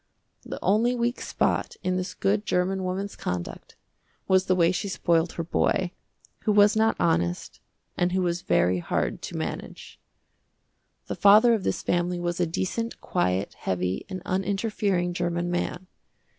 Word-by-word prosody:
The - - -7
only 230 +5 +3
weak 240 0 -1
spot - - -1
in 185 0 0
this 185 0 -3
good 205 +2 +1
german 190 0 0
woman's 190 +2 -3
conduct 90 -1 -5 0.5
was 190 0 +4
the 185 - +3
way 170 -1 +4
she 185 +2 -2
spoiled 170 -3 +1
her 165 - -3
boy, 175 +2 0 0.5
who 215 - 0
was 205 0 +5
not 220 0 +3
honest 85 +1 0 0.4
and 175 0 +1
who 185 0 +1
was 175 0 -1
very 90 - +2
hard - - -2
to - - -6
manage. - - -6 1.1
The - - -4
father 215 +4 +6
of 215 -4 0
this - - -1
family 175 0 0
was 175 0 -2
a 175 - +2
decent, 210 +7 -3
quiet, 95 - -1
heavy, 90 0 -2
and 185 -2 -6
uninterfering 195 -1 0
german 175 0 -1
man. 175 +1 -2
185 Hz, 155 wpm, -26 LUFS, 175-200 Hz, 1.1 s, father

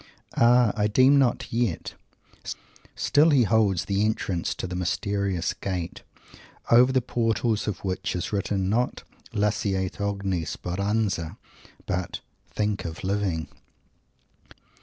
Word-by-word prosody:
Ah! 120 -2 +5
I 105 -1 +2
deem 130 +6 +5
not 125 -3 0
yet. 115 -8 -1 1.0
Still 150 +3 +4
he 140 -5 +5
holds 100 -4 +2
the 100 +1 +1
entrance 100 -5 -1
to - - -4
the 90 0 -5
mysterious 95 0 -1
Gate, 90 -3 -4 0.7
over 125 +2 +7
the 130 -2 +2
portals 115 -2 0
of 100 -1 -4
which 95 -1 -2
is 90 +4 -3
written, 100 -1 0
not 120 +5 0 0.3
"Lasciate 100 -3 -1
ogni 100 -3 -1
speranza!" 100 -1 -2 0.5
but - - -3 0.3
"Think 105 -1 -1
of 80 -1 -6
Living!" 95 -4 -1
100 Hz, 115 wpm, -26 LUFS, 95-115 Hz, 1.0 s, over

